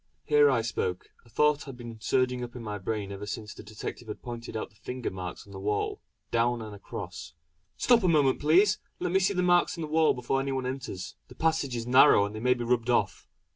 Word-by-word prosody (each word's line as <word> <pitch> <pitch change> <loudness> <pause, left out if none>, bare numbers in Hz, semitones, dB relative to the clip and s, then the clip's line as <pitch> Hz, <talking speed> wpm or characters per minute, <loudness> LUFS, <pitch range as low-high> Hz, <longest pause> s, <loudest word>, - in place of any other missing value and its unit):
Here 150 -1 +5
I 115 -4 +2
spoke; 95 -5 -3
a - - -19
thought 150 +5 +2
had 135 -3 -9
been 120 -2 -9
surging 125 0 +1
up 120 0 -8
in 120 - -7
my 105 -2 -4
brain 100 0 -3
ever 100 +1 -6
since 105 +1 -5
the - - -11
detective 110 +2 -7
had 105 - -7
pointed 120 -2 -6
out 110 - -5
the - - -27
finger 125 +3 -5
marks 90 -1 -7
on 100 - -14
the 95 - -7
wall 105 +1 -2 0.3
"down 120 +1 +2
and 110 -2 -7
across": 90 -5 -8 0.4
"Stop 240 -2 +4
a - - +3
moment 145 -6 +3
please! 190 +8 +4 0.2
Let 180 -1 -1
me 190 - +4
see 195 +1 +1
the 180 - +1
marks 175 0 +3
on 165 - -4
the - - -3
wall 155 +1 +3
before 125 +2 -1
any 135 0 -2
one 130 -1 -2
enters; 125 -8 -5
the - - -14
passage 160 -5 0
is 115 -1 -3
narrow 125 -4 +6
and 100 - -6
they 110 - -5
may 125 +2 +3
be 120 - -4
rubbed 120 0 0
off." 120 - 0
125 Hz, 240 wpm, -28 LUFS, 110-145 Hz, 0.4 s, narrow